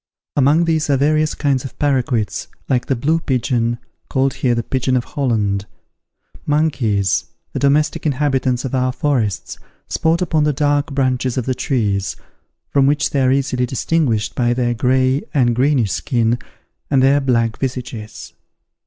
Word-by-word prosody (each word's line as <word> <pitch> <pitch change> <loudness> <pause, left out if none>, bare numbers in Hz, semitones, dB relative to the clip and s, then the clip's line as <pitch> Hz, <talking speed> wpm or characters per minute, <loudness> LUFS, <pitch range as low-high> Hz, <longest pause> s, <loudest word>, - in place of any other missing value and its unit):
Among 145 +5 +4
these 160 -2 0
are 140 - +3
various 155 +2 +2
kinds 140 -4 0
of 135 - -9
parroquets, 130 -6 0 0.2
and 125 -2 +2
the 135 - 0
blue 155 +7 +1
pigeon, 120 -4 0 0.3
called 135 0 +1
here 125 -2 0
the 115 - -1
pigeon 130 +1 0
of 120 - -1
Holland. 105 -8 -1 0.8
Monkeys, 130 -10 +1 0.3
the - - -2
domestic 145 +3 +1
inhabitants 130 -3 0
of 130 - -4
our 130 -1 +1
forests, 125 - -1 0.3
sport 165 +2 +1
upon 160 -3 +1
the 150 0 +2
dark 145 +1 +1
branches 130 -2 0
of 125 - -1
the 130 - 0
trees, 105 -9 -1 0.6
from 135 -1 +3
which 145 +1 +1
they 140 -3 +1
are 130 0 +3
easily 130 -2 0
distinguished 130 -5 0
by 120 -1 +1
their 120 -1 0
gray 130 +3 +2
and 120 -4 +3
greenish 125 -5 +2
skin, 120 -1 0 0.5
and 135 -2 +3
their 140 +2 +4
black 115 -4 0
visages. 120 -5 -5
130 Hz, 155 wpm, -19 LUFS, 120-145 Hz, 0.8 s, Among